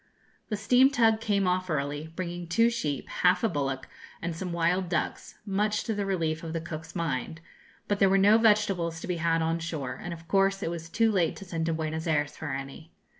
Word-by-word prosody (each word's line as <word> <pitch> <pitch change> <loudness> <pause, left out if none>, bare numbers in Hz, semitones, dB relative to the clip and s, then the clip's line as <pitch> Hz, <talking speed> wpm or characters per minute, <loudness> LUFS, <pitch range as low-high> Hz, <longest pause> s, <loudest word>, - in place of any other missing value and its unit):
The 210 - -1
steam 250 +6 +5
tug 225 -4 +3
came 200 -4 +1
off 185 0 0
early, 145 0 -2
bringing 175 -1 -4
two 230 +7 +3
sheep, 150 - -2
half 180 +5 +2
a - - +5
bullock, 135 -7 -2 0.3
and 165 -1 -3
some 180 +1 -4
wild 170 +2 +1
ducks, - - -2
much 210 +1 0
to 225 - -2
the 200 -1 -2
relief 165 -4 -1
of 165 -1 -5
the 165 - -1
cook's 160 -1 -8
mind; 160 -2 -2 0.5
but 205 -1 0
there 195 - +5
were 195 - +4
no 205 +3 +6
vegetables 200 -7 +2
to - - -6
be 180 -2 -1
had 165 0 +1
on 165 +1 0
shore, 155 -6 -4
and 175 - -5
of 165 0 -9
course 195 0 +2
it 165 - -1
was 165 -1 -6
too 225 +5 +2
late 180 -6 +1
to 195 - -9
send 165 -2 -3
to 165 - +1
Buenos 160 +1 -3
Ayres 150 -2 0
for 160 - -6
any. 135 +4 -6
170 Hz, 220 wpm, -28 LUFS, 160-200 Hz, 0.5 s, no